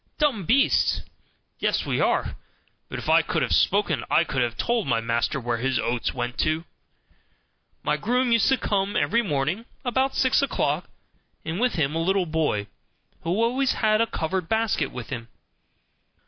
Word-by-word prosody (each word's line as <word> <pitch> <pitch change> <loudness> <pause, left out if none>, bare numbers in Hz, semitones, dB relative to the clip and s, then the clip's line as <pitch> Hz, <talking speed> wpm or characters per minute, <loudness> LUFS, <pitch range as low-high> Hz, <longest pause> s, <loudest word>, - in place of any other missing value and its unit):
"Dumb 265 - +1
beasts!" 275 +3 +3 0.6
Yes, - - 0
we - - -1
are; - - +1 0.5
but - - -5
if - - -7
I - - +5
could - - -1
have - - 0
spoken 205 +1 +2
I 165 - +4
could 135 -4 -2
have 120 -1 -1
told 235 -6 0
my 115 -3 +2
master 115 +4 -1
where 120 -2 -2
his 130 +1 0
oats 120 0 -1
went 120 -1 -4
to. 155 +2 0 1.2
My - - +1
groom 250 +2 +1
used 230 -2 +4
to 265 - +3
come 200 -3 -1
every 235 +2 +2
morning 160 +3 -1 0.2
about 265 +2 +1
six 260 0 +3
o'clock, 280 - -1 0.6
and 165 +3 -3
with 250 +1 +2
him 150 -4 0
a 165 - 0
little 190 +2 +1
boy, 155 -11 0 0.6
who 165 - -5
always 255 +3 +1
had 215 0 +2
a 230 - +2
covered 165 -1 -3
basket 225 -1 +1
with 125 -2 -7
him. 115 -3 -5
185 Hz, 170 wpm, -25 LUFS, -, 1.2 s, I